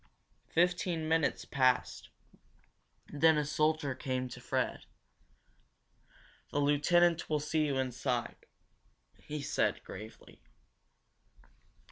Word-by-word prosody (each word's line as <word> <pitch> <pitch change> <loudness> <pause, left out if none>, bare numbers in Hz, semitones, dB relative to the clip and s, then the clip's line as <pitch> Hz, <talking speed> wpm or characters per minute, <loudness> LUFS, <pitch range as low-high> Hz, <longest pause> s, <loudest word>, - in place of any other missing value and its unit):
Fifteen 175 -1 +1
minutes 160 -1 +1
passed. 130 -2 +1 1.0
Then 160 +2 +4
a 150 - +1
soldier 150 -1 +1
came 130 0 -3
to - - -9
Fred. - - -2 1.6
"The - - -4
lieutenant 165 +4 +3
will 150 -1 +1
see 155 +1 0
you 140 -2 -1
inside," 125 -1 -3 0.7
he 150 -1 -6
said, - - 0
gravely. 110 +1 -11
150 Hz, 90 wpm, -32 LUFS, 130-160 Hz, 1.6 s, Then